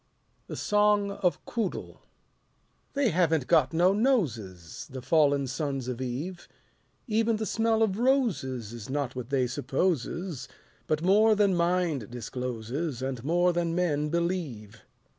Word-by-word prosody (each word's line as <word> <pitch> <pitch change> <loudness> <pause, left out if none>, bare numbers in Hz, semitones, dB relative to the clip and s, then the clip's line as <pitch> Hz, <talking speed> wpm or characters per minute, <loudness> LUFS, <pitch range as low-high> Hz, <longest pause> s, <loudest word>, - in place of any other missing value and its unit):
The - - -6
Song 210 -1 +2
of 185 -3 -1
Quoodle 225 -5 -4 0.9
They 280 -4 +2
haven't 165 -6 +2
got 150 -5 +3
no 175 +4 +4
noses, 120 - -1
The 130 - -6
fallen 140 -1 +3
sons 135 -1 -3
of 125 0 -4
Eve; 145 +9 -5 0.6
Even 225 0 +1
the 215 0 -2
smell 225 0 +2
of 205 -1 0
roses 180 - 0
Is 115 -1 -8
not 140 -2 -2
what 125 -1 -6
they 135 -2 +2
supposes; 150 +5 -2 0.4
But 155 +1 0
more 215 +4 +5
than 200 -2 +3
mind 170 - 0
discloses 125 +3 -4
And 130 -3 -3
more 175 +4 +2
than 170 -1 -1
men 150 -4 0
believe. 155 - -3
160 Hz, 135 wpm, -28 LUFS, 130-190 Hz, 0.9 s, more